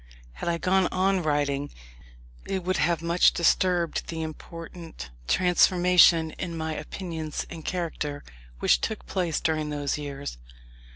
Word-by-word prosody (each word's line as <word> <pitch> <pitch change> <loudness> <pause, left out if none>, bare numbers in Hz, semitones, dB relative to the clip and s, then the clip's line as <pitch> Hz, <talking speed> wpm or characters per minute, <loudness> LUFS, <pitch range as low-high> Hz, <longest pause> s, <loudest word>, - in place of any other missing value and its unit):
Had 115 - -4
I 170 - +1
gone 185 +1 +2
on 190 0 +1
writing, 145 -2 0 0.8
it 190 -2 -2
would 185 +1 0
have 170 -2 +1
much 170 +1 +4
disturbed 175 0 +1
the 160 -1 -4
important 165 - -8 0.2
transformation 180 - +5
in 170 -2 -4
my 160 0 -2
opinions 160 0 -5
and 165 -2 -8
character, 155 -5 -3 0.3
which - - +3
took 220 - -3
place 175 -5 -1
during 155 -2 0
those 145 0 -2
years. 140 - -6
165 Hz, 130 wpm, -26 LUFS, 150-180 Hz, 0.8 s, transformation